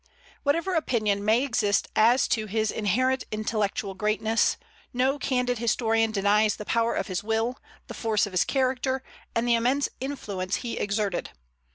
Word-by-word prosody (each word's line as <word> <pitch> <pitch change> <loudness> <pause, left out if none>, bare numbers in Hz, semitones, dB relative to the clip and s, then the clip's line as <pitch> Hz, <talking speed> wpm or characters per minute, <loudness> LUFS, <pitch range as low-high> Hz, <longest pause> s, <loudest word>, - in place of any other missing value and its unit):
Whatever 335 +6 0
opinion 215 - 0
may 220 +5 +3
exist 210 -7 +1
as 235 +4 +4
to 215 -1 0
his 215 +1 0
inherent 255 +5 +1
intellectual 215 -2 -2
greatness, 215 +3 +1 0.4
no 260 +3 +1
candid 250 -3 0
historian 225 -1 +1
denies 210 0 +2
the 210 - -8
power 230 +1 +1
of - - -1
his 185 -2 -3
will, 225 +3 -1 0.3
the - - -8
force 220 -3 +1
of 200 - -9
his 185 - +3
character, 260 0 0 0.3
and 230 +1 +1
the 240 - +4
immense 250 +5 +2
influence 205 -9 -3
he 235 - -3
exerted. 205 -2 -1
225 Hz, 155 wpm, -26 LUFS, 210-255 Hz, 0.4 s, as